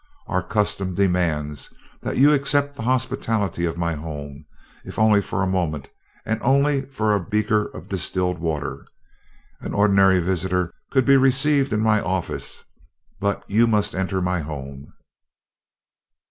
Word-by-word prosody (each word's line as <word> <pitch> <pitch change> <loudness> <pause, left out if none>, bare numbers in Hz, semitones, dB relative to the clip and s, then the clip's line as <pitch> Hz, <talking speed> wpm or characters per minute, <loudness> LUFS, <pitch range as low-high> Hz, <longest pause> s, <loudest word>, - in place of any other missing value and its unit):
Our 90 -1 -1
custom 95 -1 -1
demands 85 -7 0 0.3
that - - -3
you 145 +4 +6
accept 145 0 +1
the - - -8
hospitality 115 -7 -1
of 85 0 -3
my 85 -1 -1
home, 75 -2 -7 0.4
if - - -10
only 110 -2 +4
for 95 -1 -2
a - - +2
moment 85 -6 -2 0.4
and 115 0 -2
only 140 +1 +2
for 110 -6 0
a 105 - +2
beaker 105 +3 +1
of - - -11
distilled 90 -1 -1
water. 75 -4 -3 0.8
Any - - -4
ordinary 100 -2 +4
visitor 90 0 -1 0.2
could 130 -2 +2
be 135 0 +6
received 135 +1 +3
in 105 0 +1
my 110 -1 +3
office, 95 -2 -3 0.6
but 100 0 -2
you 115 +3 +3
must 105 -2 +1
enter 95 0 -1
my 90 0 0
home." 70 -3 -7
95 Hz, 145 wpm, -22 LUFS, 85-115 Hz, 0.8 s, you